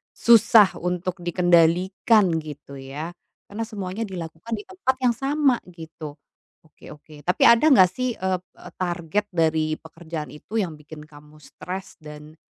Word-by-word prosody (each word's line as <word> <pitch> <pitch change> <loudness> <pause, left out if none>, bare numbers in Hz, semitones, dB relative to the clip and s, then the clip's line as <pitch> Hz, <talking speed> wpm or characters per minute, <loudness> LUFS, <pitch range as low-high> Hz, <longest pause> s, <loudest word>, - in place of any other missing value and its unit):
susah 220 -3 +6
untuk 180 +1 -3
dikendalikan 175 +3 +3
gitu 145 -3 -10
ya, 140 +5 -6 0.4
karena 220 +3 -3
semuanya 200 -1 -5
dilakukan 170 +2 -8
di 210 - -8
tempat 315 -9 -1
yang 245 - +4
sama 275 +1 +2
gitu. 160 -3 -10 0.5
Oke 155 - -16
oke. 150 0 -16
Tapi 180 +5 0
ada 235 +6 +6
enggak 190 - +6
sih, 250 +3 -2
eee 185 -1 -1
eee, 185 - -15
target 180 +3 -2
dari 160 -2 +1
pekerjaan 160 -1 -8
itu 150 +8 -10
yang 180 -6 -2
bikin 150 0 -12
kamu 150 0 -17
stres 190 +5 -8
dan, 150 0 -12
175 Hz, 145 wpm, -23 LUFS, 155-205 Hz, 0.5 s, susah